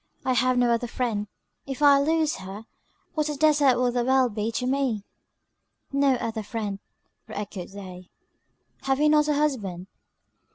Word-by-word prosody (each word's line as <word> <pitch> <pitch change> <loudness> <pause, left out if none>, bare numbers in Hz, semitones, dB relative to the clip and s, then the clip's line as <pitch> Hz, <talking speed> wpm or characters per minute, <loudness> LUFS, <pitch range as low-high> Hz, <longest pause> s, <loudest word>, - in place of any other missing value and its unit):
I 260 - +2
have 255 0 +2
no 245 -1 +3
other 235 +1 -1
friend; 230 -4 -2 0.4
if 270 +1 -4
I 285 -1 +7
lose 315 +1 +1
her, 195 +3 -9 0.5
what 305 -2 0
a - - -1
desart 290 -3 +4
will 250 0 +2
the 245 0 0
world 260 -2 +3
be 215 +1 -2
to 250 - -2
me." 255 -5 0 0.9
"No 275 -1 +3
other 225 -2 -3
friend," 210 -2 -4 0.5
re 220 - -9
echoed 200 -3 -6
they, 185 -2 -10 0.8
"have 270 0 +1
you 300 0 +4
not 300 0 +4
a 300 - +2
husband?" 215 -12 -1
250 Hz, 165 wpm, -25 LUFS, 210-280 Hz, 0.9 s, I